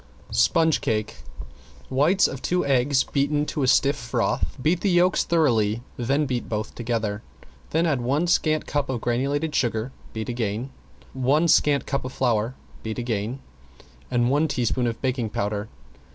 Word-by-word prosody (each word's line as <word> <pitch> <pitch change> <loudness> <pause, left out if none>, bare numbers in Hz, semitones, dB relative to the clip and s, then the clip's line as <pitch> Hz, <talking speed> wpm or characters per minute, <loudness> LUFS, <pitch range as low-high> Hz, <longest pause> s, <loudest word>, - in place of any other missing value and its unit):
~SPONGE 155 - +3
CAKE~ 110 -1 -2 0.7
Whites 155 +9 +4
of 135 - -7
two 180 -2 0
eggs 135 0 +3
beaten 145 +1 0
to 150 - -3
a 130 - +2
stiff 140 +3 +4
froth, 120 -4 -2
beat 165 +6 +1
the 200 - +1
yolks 175 0 +3
thoroughly, 120 -9 +2
then 135 +5 0
beat 125 -3 -3
both 105 -1 -3
together, 110 -3 -2 0.5
then 165 +2 +1
add 145 -7 +1
one 140 +7 +1
scant 155 -3 +1
cup 145 -2 -2
of 130 -3 -1
granulated 140 +7 -1
sugar 115 0 0 0.2
(beating 110 +2 -4
again), 115 +2 -2 0.4
one 135 +6 +2
scant 145 -3 +3
cup 140 - -2
of 130 - -5
flour 120 -1 0 0.3
(beat 110 -1 -5
again), 120 +1 -3 0.7
and 120 0 +1
one 150 +3 +2
teaspoon 125 -2 0
of 115 -1 -3
baking 125 -4 -1
powder. 105 +1 -3
130 Hz, 155 wpm, -24 LUFS, 115-145 Hz, 0.7 s, Whites